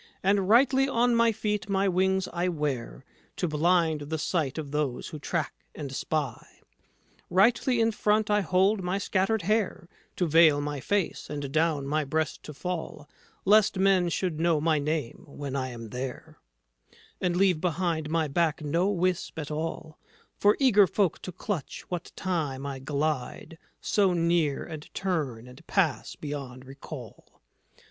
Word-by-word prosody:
And 195 0 +2
rightly 270 +3 +5
on 245 -1 +2
my 230 0 +4
feet 210 -1 -2
my 195 0 +2
wings 190 +1 +1
I 175 +1 0
wear, 145 -6 -3 0.3
To 180 - -1
blind 160 0 +2
the 160 - -1
sight 155 -3 -1
of 150 -3 -5
those 145 -4 -2
who 155 - -7
track 160 0 -2 0.2
and 145 -3 -6
spy; 145 -2 -2 0.9
Rightly 230 +6 +3
in 225 0 +3
front 210 0 +1
I 210 0 +4
hold 190 +3 +2
my 180 +1 -1
scattered 195 +1 0
hair 205 -3 0 0.3
To 180 - +1
veil 160 -2 +5
my 145 0 -3
face, 200 +6 -1
and 145 -2 -4
down 155 -2 +1
my 155 +2 0
breast 155 +3 -2
to 150 - -8
fall, 160 -2 -5 0.4
Lest 210 0 +5
men 190 -2 +3
should 170 -2 -2
know 165 -2 +2
my 155 0 +2
name 150 -4 -3
when 140 -1 -6
I 130 -1 -1
am 115 -2 -8
there; 125 +2 -6 0.8
And 180 -2 +1
leave 185 -4 +3
behind 170 -3 -1
my 160 -1 +1
back 160 +1 0
no 170 +6 +1
wisp 185 -4 -1
at 155 -1 -5
all 155 0 -5 0.4
For 205 +1 +3
eager 210 -8 +6
folk 190 -4 0
to 185 - -6
clutch, 180 -2 -5
what 180 -1 -4
time 150 -8 -2
I 140 -1 -4
glide 145 +3 -3 0.2
So 195 -3 +2
near, 170 -4 +1
and 155 -2 -9
turn, 145 -11 -2
and 125 +6 -14
pass 175 -8 0
beyond 135 -4 -6
recall." 135 - -11
165 Hz, 155 wpm, -27 LUFS, 145-190 Hz, 0.9 s, eager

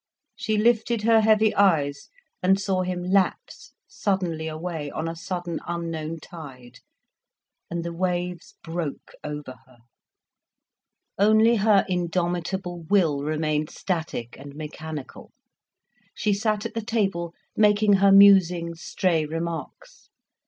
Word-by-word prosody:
She 215 -1 -1
lifted 225 0 +2
her 225 0 +5
heavy 215 0 +4
eyes 145 -8 +2 0.3
and 190 +1 +3
saw 190 -2 0
him 180 -1 -3
lapse 190 +1 -1
suddenly 175 -5 -2
away, 160 -1 -5
on 160 +3 -4
a 165 - -4
sudden, 175 0 -4
unknown 165 -2 -4
tide, 135 -7 -12 0.9
and 170 0 -3
the 170 - -4
waves 180 0 -3
broke 165 -3 -5
over 150 -4 -6
her. 130 -2 -21 1.4
Only 220 +3 +5
her 205 -1 +4
indomitable 175 0 -2
will 165 -8 +3
remained 155 0 -1
static 160 - -4
and 140 +1 -11
mechanical, 155 -1 -8 0.8
she 210 -1 +1
sat 210 +1 -1
at - - -4
the 225 - -2
table 195 -7 -1 0.2
making 210 -1 +4
her 195 0 +5
musing, 185 -4 +6
stray 165 0 0
remarks. 165 -2 -6
175 Hz, 115 wpm, -25 LUFS, 160-200 Hz, 1.4 s, musing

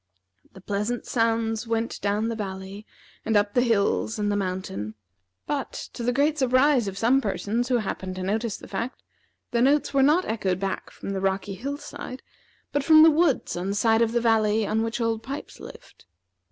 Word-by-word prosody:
The 190 - -13
pleasant 210 +5 -2
sounds 225 -1 0
went 230 0 -2
down 205 +2 0
the 230 - -2
valley 195 0 -6 0.4
and 220 -1 +2
up 205 0 +1
the 245 - +4
hills 225 -1 +1
and 205 -1 0
mountain, 185 - -3 0.5
but, 285 -2 -3 0.2
to - - -7
the 240 +1 +1
great 290 +4 +1
surprise 260 -2 +3
of 195 0 -5
some 245 +6 +3
persons 225 +3 -2
who 250 - +3
happened 190 -4 -4
to 185 - -5
notice 215 +3 -1
the - - -12
fact, 230 +6 -5 0.5
the 235 - +1
notes 280 +4 +3
were 275 - +4
not 305 +7 +4
echoed 190 -5 -1
back 195 0 -3
from - - -7
the 195 -1 -2
rocky 195 +1 -1
hill 275 +9 -4
side, 260 -3 -8 0.5
but 285 - 0
from 310 +1 +8
the 325 - +8
woods 310 -3 +1
on 175 +2 -3
the 200 - -1
side 225 +2 +3
of 230 -1 +2
the 240 - +2
valley 220 -2 +2
on 220 +2 0
which 225 +1 -2
Old 225 -1 0
Pipes 275 +4 -7
lived. - - -13
225 Hz, 195 wpm, -25 LUFS, 200-250 Hz, 0.5 s, from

